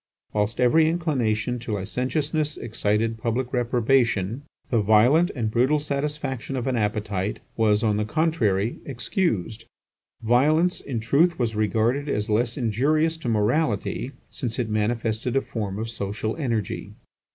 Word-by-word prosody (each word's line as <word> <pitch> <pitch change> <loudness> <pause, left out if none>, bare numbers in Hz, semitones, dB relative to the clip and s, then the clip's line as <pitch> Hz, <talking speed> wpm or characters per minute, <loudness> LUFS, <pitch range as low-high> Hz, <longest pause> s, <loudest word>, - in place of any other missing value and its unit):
Whilst 105 +2 -1
every 155 +6 +4
inclination 125 -8 0
to 115 -2 -5
licentiousness 145 - -1
excited 110 0 -1
public 120 +3 -2
reprobation, 120 -2 +1 0.3
the 115 -3 +3
violent 120 - +5
and 110 -4 -1
brutal 130 +6 +3
satisfaction 140 -2 -3
of 125 - -2
an 130 -2 0
appetite 105 -2 -1 0.2
was, 105 -1 +2
on 105 -2 +2
the 105 - 0
contrary, 115 - 0
excused; 115 - -2 0.6
violence, 155 +10 +3
in 120 -5 -4
truth, 160 +9 +3
was 115 -3 -1
regarded 115 +7 +1
as 105 -3 -1
less 115 +2 +1
injurious 145 +7 +1
to 140 -7 -4
morality, 115 +3 0 0.2
since 120 -3 -4
it 120 -4 -1
manifested 110 +2 -1
a 135 - +3
form 105 -6 -4
of 110 +1 -3
social 110 0 -3
energy. 115 - -2
120 Hz, 135 wpm, -24 LUFS, 110-140 Hz, 0.6 s, violent